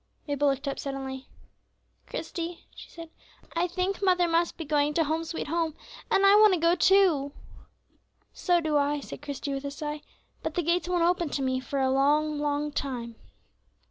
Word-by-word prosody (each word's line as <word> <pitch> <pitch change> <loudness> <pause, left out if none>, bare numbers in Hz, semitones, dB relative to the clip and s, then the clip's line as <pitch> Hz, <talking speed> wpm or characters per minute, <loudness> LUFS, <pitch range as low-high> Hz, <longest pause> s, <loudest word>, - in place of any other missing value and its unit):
Mabel 285 0 +1
looked 275 +1 0
up 275 - -3
suddenly. 270 -1 -5 0.8
"Christie," 340 -1 -5
she - - -12
said, 330 -1 -11 0.4
"I 345 +2 +1
think 365 +3 -2
mother 360 -3 +3
must 335 +1 +1
be 325 - -5
going 295 0 +1
to 330 - +3
'Home, 320 +2 -1
sweet 330 0 -4
Home,' 325 0 -1 0.3
and 390 - +3
I 395 - +7
want 425 -3 +6
to - - -3
go 335 +1 +4
too." 355 -7 +3 1.0
"So 350 -1 +2
do 310 -2 +1
I," 290 +1 +1
said 275 - -9
Christie, 285 -1 -4
with 275 0 -4
a 280 - -3
sigh, 295 +1 -5 0.4
"but - - -4
the 350 - 0
gates 345 +2 0
won't 350 -2 +1
open 345 -2 +1
to 280 - -2
me 260 0 0
for 275 +1 -4
a 265 0 +2
long, 295 +3 +2
long 295 0 -1
time." 245 -5 -4
300 Hz, 185 wpm, -27 LUFS, 280-345 Hz, 1.0 s, I